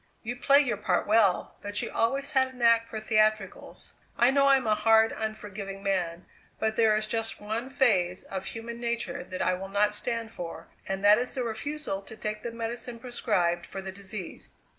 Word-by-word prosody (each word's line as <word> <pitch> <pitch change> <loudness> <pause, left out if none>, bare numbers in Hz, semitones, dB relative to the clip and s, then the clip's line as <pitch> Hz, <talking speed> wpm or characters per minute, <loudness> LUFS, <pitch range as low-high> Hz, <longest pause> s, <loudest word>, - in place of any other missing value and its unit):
You 240 +1 -4
play 275 +3 +5
your 250 -7 -1
part 190 -3 0
well; 210 -3 +2
but 205 0 -1
you - - -4
always 275 +5 0
had 265 -2 +3
a 260 -1 -13
knack 230 -1 +4
for 220 - -5
theatricals. 215 -2 0 0.2
I 240 +2 +5
know 275 0 +4
I'm 270 -2 +4
a 215 - +3
hard, 220 +1 +4
unforgiving 205 -2 -5
man, 180 -3 -1 0.3
but 220 0 0
there 220 -1 +4
is 215 0 0
just 225 +1 -3
one 220 +5 -4
phase 190 -10 +2
of 190 -1 -6
human 235 +2 -6
nature 235 -8 -3
that 185 0 -4
I 185 - +2
will 190 +1 -5
not 210 +1 +2
stand 230 +1 -3
for, 175 -5 -7 0.2
and 195 +1 -2
that 210 +2 +7
is 250 - -2
the 255 - -1
refusal 235 -1 -4
to 215 +3 -12
take 215 0 -4
the 235 - -4
medicine 235 +1 -5
prescribed 200 -8 -1
for 195 - -6
the 190 0 -6
disease. 195 -1 -6
220 Hz, 195 wpm, -28 LUFS, 195-235 Hz, 0.3 s, that